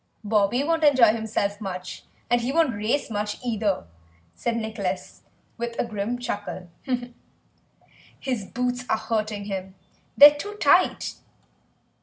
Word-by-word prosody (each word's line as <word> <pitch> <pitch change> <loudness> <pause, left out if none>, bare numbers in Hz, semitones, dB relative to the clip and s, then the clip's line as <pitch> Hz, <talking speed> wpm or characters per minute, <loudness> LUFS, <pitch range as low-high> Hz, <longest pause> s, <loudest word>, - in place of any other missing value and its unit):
"Bobby 210 +4 +2
won't 325 +1 0
enjoy 255 -7 +6
himself 220 -2 -2
much, 185 -2 -6 0.2
and 240 0 +2
he 245 +3 -1
won't 320 -4 +3
race 225 +6 -1
much 210 0 -2
either," 215 - 0 0.5
said 235 -1 -2
Nicholas 210 -5 -4 0.4
with 235 0 -4
a - - 0
grim 220 +2 -3
chuckle; 205 -6 -5 1.5
"his 250 -7 -3
boots 250 +3 -2
are - - +3
hurting 215 -2 -2
him. 190 -2 -5 0.4
They're 290 +1 +11
too 410 +8 -6
tight." - - +3
220 Hz, 125 wpm, -25 LUFS, 205-245 Hz, 1.5 s, They're